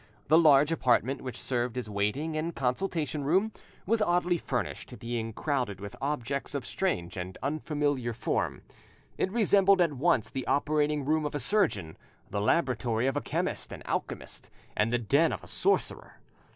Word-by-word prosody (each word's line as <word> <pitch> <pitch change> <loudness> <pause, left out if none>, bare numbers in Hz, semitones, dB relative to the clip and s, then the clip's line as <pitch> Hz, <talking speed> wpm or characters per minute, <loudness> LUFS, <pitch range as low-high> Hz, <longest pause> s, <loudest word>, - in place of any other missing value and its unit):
The 160 - +7
large 150 -1 +6
apartment, 130 -3 +2
which 125 -3 -6
served 125 -1 -2
as 125 - -3
waiting 105 +10 -1
and 160 +2 -2
consultation 150 +3 -1
room, 190 +10 +2 0.3
was 225 +3 +2
oddly 175 -2 +2
furnished, 125 -1 -4
being 115 -1 -3
crowded 125 - -2
with 100 0 -7
objects 140 0 -2
of 140 - -3
strange 95 - -2
and 90 +1 -5
unfamiliar 145 -3 -1
form. 115 - -2 0.6
It 190 - +1
resembled 200 -3 +4
at 170 -4 +3
once 135 -5 +2
the 130 0 -5
operating 150 0 +1
room 155 +2 +2
of 150 0 -3
a - - 0
surgeon, 130 - 0 0.3
the 100 - -1
laboratory 120 -2 +1
of 135 - +1
a - - 0
chemist - - -2
and - - -9
alchemist, - - -4 0.3
and 105 +2 +2
the 120 - +3
den 140 +8 +3
of - - -5
a - - -11
sorcerer. 400 - 0
140 Hz, 165 wpm, -29 LUFS, 120-160 Hz, 0.6 s, The